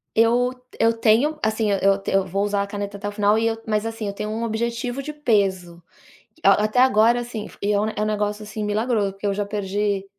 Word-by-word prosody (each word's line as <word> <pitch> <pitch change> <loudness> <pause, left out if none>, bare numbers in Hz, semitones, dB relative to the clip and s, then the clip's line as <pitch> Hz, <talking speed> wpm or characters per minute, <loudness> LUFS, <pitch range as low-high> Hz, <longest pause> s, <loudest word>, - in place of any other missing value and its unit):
Eu 240 +2 +3 0.3
eu 230 0 +4
tenho, 240 +8 +3
assim, 215 -1 +1
eu 195 0 +2
eu 195 -1 +2
vou 195 +2 -1
usar 205 -1 0
a - - -6
caneta 200 0 -5
até 205 - -5
o - - -3
final 205 +1 +2
e 225 - +1
eu, 225 0 -1
mas 215 0 0
assim, 225 -1 -4
eu 200 - -3
tenho 210 +1 -5
um 225 +2 -3
objetivo 235 +3 -2
de 300 - -6
peso. 195 - 0 0.6
A 195 +1 +5
até 215 +4 0
agora 235 -1 +5
assim, 235 -3 -6 0.2
é 205 - +1
é 205 - +2
um 215 0 -1
negócio, 210 0 -2
assim, 210 +1 -5
milagroso, 210 -1 0
porque 195 +1 -9
eu 200 - +1
já 205 +1 -2
perdi 200 -1 -2
210 Hz, 220 wpm, -22 LUFS, 200-225 Hz, 0.6 s, A